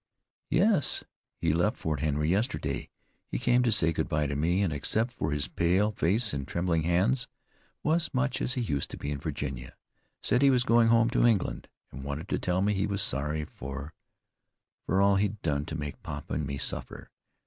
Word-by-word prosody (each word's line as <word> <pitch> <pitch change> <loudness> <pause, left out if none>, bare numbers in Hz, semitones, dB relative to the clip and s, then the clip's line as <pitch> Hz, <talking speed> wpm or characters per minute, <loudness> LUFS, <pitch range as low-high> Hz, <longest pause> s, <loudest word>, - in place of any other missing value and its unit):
"Yes, 195 -3 +2 0.3
he 85 -2 +1
left 90 +6 +1
Fort 75 -2 -2
Henry 75 -1 0
yesterday. 85 - -1 0.4
He - - -2
came 125 0 +3
to 120 -2 +2
say 85 -6 +3
good 80 - -2
bye 75 -2 +1
to 70 0 -2
me, 85 +7 +2
and, 85 -6 0
except 110 - 0
for 80 -10 -3
his 75 -3 -1
pale 90 - +2
face 105 +3 +1
and 70 0 -3
trembling 85 -1 0
hands, 95 +10 +1 0.6
was 160 +2 +1
much 130 -1 0
as 125 - 0
he 125 - 0
used 70 -10 -1
to - - -7
be 70 - -4
in 70 - -3
Virginia. 70 -4 -5 0.5
Said 125 - +2
he 140 - +6
was 125 -2 +4
going 115 -1 +4
home 115 0 +4
to 125 - +4
England, 110 -6 0 0.2
and 70 - -8
wanted 70 +6 -5
to - - 0
tell 90 +1 0
me 105 +1 +2
he 100 +1 0
was 100 -1 -1
sorry 75 +4 -1
for 70 +2 -7 0.9
for 95 - +2
all 100 0 +5
he'd 105 +1 0
done 75 -2 0
to 80 - -4
make 75 -2 -5
papa 75 -3 -6
and 75 0 -1
me 70 0 -3
suffer. - - -4
85 Hz, 200 wpm, -29 LUFS, 75-115 Hz, 0.9 s, he